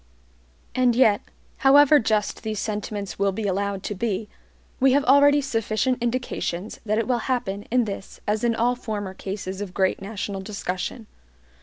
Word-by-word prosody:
And 250 -2 +3
yet, 220 -5 +4 0.4
however 290 +2 +6
just 215 -2 0
these 220 -2 -3
sentiments 205 -3 -4
will 200 0 +2
be 210 +3 -4
allowed 200 0 -1
to - - -3
be, 210 0 -2 0.5
we 265 0 +5
have 285 +1 +3
already 285 +2 +6
sufficient 245 -1 -1
indications 235 -6 -3
that 215 +1 +1
it 225 - 0
will 250 -2 +1
happen 205 -6 -2
in 245 0 +2
this 200 -2 -7
as 210 +2 0
in 235 -1 +2
all 240 +2 +2
former 210 -5 -5
cases 190 0 -5
of 190 -3 -6
great 190 -1 +1
national 200 -1 -4
discussion. 200 +2 -4
215 Hz, 160 wpm, -24 LUFS, 200-245 Hz, 0.5 s, however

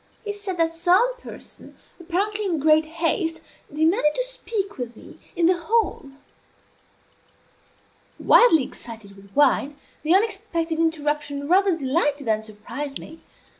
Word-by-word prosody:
He 415 - -3
said 405 -3 -6
that 330 -1 +1
some 370 +9 +3
person, - - -12 0.2
apparently 400 +5 -2
in 350 -4 0
great 310 +1 +4
haste, 330 +1 -1 0.3
demanded 305 0 +2
to - - 0
speak 435 - -5
with 240 -2 -5
me - - -14 0.2
in 345 -1 +2
the 360 +1 +4
hall. 415 -6 0 2.1
Wildly 325 - +5
excited 220 -5 -10
with 195 0 -16
wine, 290 0 +3 0.2
the 320 +4 +3
unexpected 380 -6 -1
interruption 295 -3 -1
rather 375 0 +3
delighted 290 0 0
than 215 -1 +1
surprised 220 +7 -6
me. 320 +1 -12
325 Hz, 130 wpm, -23 LUFS, 290-380 Hz, 2.1 s, Wildly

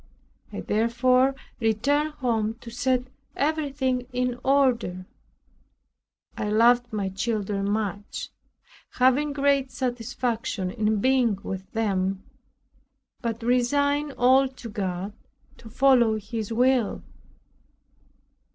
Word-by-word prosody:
I - - -5
therefore 250 +4 +2 0.2
returned 280 +7 +1
home 225 -5 -1
to 230 - -9
set 250 +1 0 0.3
everything 275 -4 -1
in 250 0 -1
order. 245 -10 +1 1.3
I 210 - -3
loved 240 +3 +4
my 205 -3 -2
children 200 0 -2
much, 205 -1 -3 0.6
having 260 +4 +3
great 280 -1 +1
satisfaction 235 -5 -2
in 215 -2 0
being 255 -5 +3
with 190 -1 -6
them, 195 -3 -1 1.0
but 230 -1 -3
resigned 285 +4 +1
all 260 +2 +4
to 255 -2 -10
God 195 -1 -3 0.4
to 225 - -13
follow 245 -2 +4
His 215 +1 -5
will. 250 -1 +2
240 Hz, 95 wpm, -25 LUFS, 215-260 Hz, 1.3 s, loved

